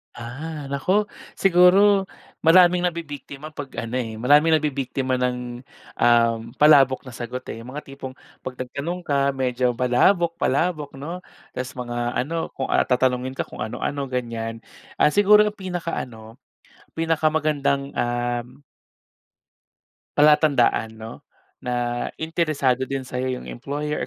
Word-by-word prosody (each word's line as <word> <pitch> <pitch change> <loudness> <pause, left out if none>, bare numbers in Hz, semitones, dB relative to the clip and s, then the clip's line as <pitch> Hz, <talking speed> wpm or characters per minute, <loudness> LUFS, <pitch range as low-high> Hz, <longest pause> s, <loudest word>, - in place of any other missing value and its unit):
Ah. 145 +6 -7
Naku 185 +9 +1 0.3
siguro 195 +2 +5 0.3
maraming 175 +2 +6
nabibiktima 155 -3 -7
'pag 145 -2 -7
ano, 115 +1 -4
eh. 115 -2 -4
Maraming 145 +8 +4
nabibiktima 135 -3 -1
ng, 125 -1 -2 0.4
um, 115 -1 +4 0.2
palabok 140 -3 +5
na 130 - -10
sagot, 120 +2 -6
eh. 115 - -7
Yung 125 +3 -10
mga 150 - -5
tipong 135 -1 -9 0.2
'pag 130 - -7
nagtanong 140 +8 -5
ka 140 -3 +1
medyo 125 -1 0
palabok 165 +8 +2
palabok, 150 0 0
'no? 160 +7 -6 0.3
Tas 130 +1 -6
mga 120 -1 -3
ano 160 +5 -2
kung, 135 - -3
ah, - - +3
tatanungin 130 0 +1
ka - - -1
kung - - -13
ano 110 - -5
ano, 140 -1 -2
ganyan. 115 -3 -4 0.3
Ah, 150 - +4
siguro 210 +2 +6
ang 210 - 0
pinakaano 135 - -6 0.6
pinakamagandang, 155 -3 0
um 120 +2 -2 1.6
Palatandaan 145 -7 +4
'no, 110 +1 -8 0.5
na 120 -1 -2
interesado 155 -6 0
din 135 -1 -3
sa'yo 130 0 -3
yung - - -8
employer 145 +4 -4
135 Hz, 125 wpm, -23 LUFS, 125-155 Hz, 1.6 s, maraming